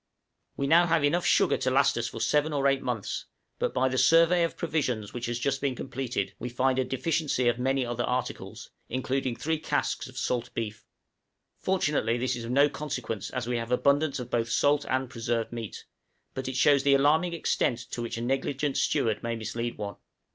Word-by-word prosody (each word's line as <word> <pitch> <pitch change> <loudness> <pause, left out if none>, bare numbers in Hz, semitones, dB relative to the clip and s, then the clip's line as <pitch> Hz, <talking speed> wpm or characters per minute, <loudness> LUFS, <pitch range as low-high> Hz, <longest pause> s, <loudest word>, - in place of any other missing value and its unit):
We 140 - 0
have 170 +3 +5
now 165 0 +4
enough 170 +5 +2
sugar - - +4
to - - 0
last - - +3
us - - -1
for - - -7
seven 150 +1 +1
or 140 -1 +2
eight 135 -1 +2
months, 120 -5 -3 0.3
but - - 0
by 130 +1 +2
the 130 0 0
survey 170 +1 +5
of 170 - -2
provisions 130 - -2
which 120 -1 -4
has 120 0 -2
just 135 +2 -1
been 135 -2 0
completed, 130 -1 -3
we 125 - -4
find 130 +2 +1
a - - +3
deficiency 135 0 0
of 120 0 +2
many 135 0 +1
other 120 0 -2
articles, 125 +1 -4 0.2
including 130 0 -1
three 160 +4 -1
casks 150 -2 -1
of 130 0 -13
salt 125 -2 -1
beef. 110 -2 -5 0.7
Fortunately 150 -11 +1
this 125 +1 -1
is 120 -1 -6
of - - -6
no 140 +3 +5
consequence 125 -9 -4
as 125 -3 -3
we 120 0 -1
have 115 +1 -4
abundance 140 +3 +2
of 125 -2 -7
both 115 -1 0
salt 145 +4 +2
and 130 0 0
preserved 115 -1 -2
meat, 115 -3 -6 0.5
but 130 -1 -4
it 130 - -3
shows 140 +1 +5
the 140 0 +4
alarming 155 +5 +3
extent 145 -6 0
to 120 - -3
which 115 -1 -4
a - - -4
negligent 135 +3 -1
steward 110 -3 +1
may 115 0 -2
mislead 115 +2 -4
one. 100 -1 -5
130 Hz, 200 wpm, -28 LUFS, 120-145 Hz, 0.7 s, have